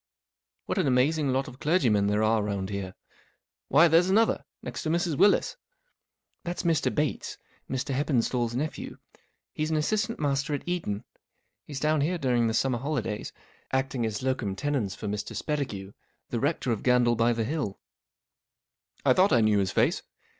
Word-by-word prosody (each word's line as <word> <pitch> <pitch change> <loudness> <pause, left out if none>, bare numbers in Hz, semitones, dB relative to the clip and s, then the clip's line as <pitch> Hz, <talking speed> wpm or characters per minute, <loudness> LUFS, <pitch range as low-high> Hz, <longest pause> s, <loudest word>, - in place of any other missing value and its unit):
" - - -59
What - - -1
an 175 - +2
amazing 140 +3 +2
lot 135 +1 0
of 130 +1 -11
clergymen 120 - +2
there 105 +1 +1
are 110 0 +3
round 100 -1 -3
here. 95 -2 -4 0.7
Why, 160 +5 +6
there's 170 +3 +4
another, 220 +4 +2 0.2
next - - -5
to 155 - -2
Mrs. 170 -1 0
Willis." 200 +8 +3 0.4
" - - -54
That's 175 0 -4
Mr. 165 -3 +2
Bates, 150 -1 -2 0.3
Mr. 130 +2 -2
HeppenstalTs 125 -4 0
nephew. 150 +5 -4 0.6
He's 155 0 -2
an 160 - +1
assistant 215 +8 0
master 140 0 0
at 140 - -7
Eton. 160 - -2 0.6
He's 145 -3 -5
down 155 0 +2
here 175 +5 0
during 125 -6 +1
the 110 - 0
summer 125 -1 +1
holidays^ 125 -6 -3 0.4
acting 130 -2 0
as 105 +2 -4
locum 125 -7 -1
tenens 130 -6 -1
for - - -8
Mr. 105 +1 -4
Spettigue, 110 -11 -3 0.4
the 120 - -1
rector 140 -2 0
of 110 - -1
Gandle 125 -1 +3
by 115 +1 +3
the 115 -1 0
Hill." 135 -5 -3 0.6
" - - -39
I - - +6
thought 190 +2 +4
I 120 -5 +5
knew 110 -2 +3
his 95 -1 +1
face. - - +2
130 Hz, 175 wpm, -27 LUFS, 110-155 Hz, 0.7 s, Why